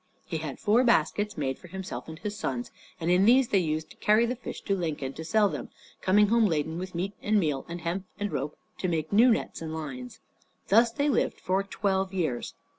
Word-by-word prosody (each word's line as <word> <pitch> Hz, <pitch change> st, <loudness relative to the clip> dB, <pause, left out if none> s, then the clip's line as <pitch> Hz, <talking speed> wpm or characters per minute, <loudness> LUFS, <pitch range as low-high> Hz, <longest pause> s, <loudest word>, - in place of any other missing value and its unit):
He 160 Hz, -, -3 dB
had 155 Hz, -4 st, -5 dB
four 225 Hz, +3 st, +3 dB
baskets 210 Hz, -2 st, +2 dB
made 135 Hz, -3 st, -2 dB
for -, -, -13 dB
himself 190 Hz, +1 st, -6 dB
and 160 Hz, 0 st, -8 dB
his 210 Hz, +3 st, -4 dB
sons, 125 Hz, -10 st, -3 dB, 0.3 s
and 170 Hz, +1 st, 0 dB
in 180 Hz, +2 st, +5 dB
these 250 Hz, +2 st, +5 dB
they 195 Hz, -, +4 dB
used 155 Hz, -2 st, -2 dB
to -, -, -13 dB
carry 215 Hz, +2 st, +4 dB
the 245 Hz, +2 st, -1 dB
fish 240 Hz, -, -7 dB
to 200 Hz, -, 0 dB
Lincoln, 150 Hz, -7 st, -3 dB
to 160 Hz, -, -7 dB
sell 210 Hz, +5 st, +3 dB
them, -, -, -5 dB, 0.3 s
coming 205 Hz, +2 st, +4 dB
home 230 Hz, -1 st, +4 dB
laden 160 Hz, -1 st, -1 dB
with 185 Hz, -1 st, -6 dB
meat 190 Hz, +4 st, -2 dB
and 210 Hz, 0 st, +3 dB
meal, 150 Hz, -7 st, -1 dB
and 170 Hz, 0 st, -5 dB
hemp 175 Hz, +4 st, -2 dB
and 205 Hz, -1 st, -2 dB
rope 145 Hz, +3 st, -3 dB, 0.2 s
to 185 Hz, -, -1 dB
make 160 Hz, 0 st, -1 dB
new 230 Hz, +5 st, +7 dB
nets 225 Hz, -, 0 dB
and 160 Hz, -1 st, -4 dB
lines. 130 Hz, -6 st, -6 dB, 0.5 s
Thus 230 Hz, +4 st, +6 dB
they 285 Hz, +5 st, 0 dB
lived 285 Hz, -, +1 dB
for 190 Hz, +2 st, +1 dB
twelve 195 Hz, -1 st, -1 dB
years. 155 Hz, -10 st, -2 dB
185 Hz, 220 wpm, -28 LUFS, 160-210 Hz, 0.5 s, new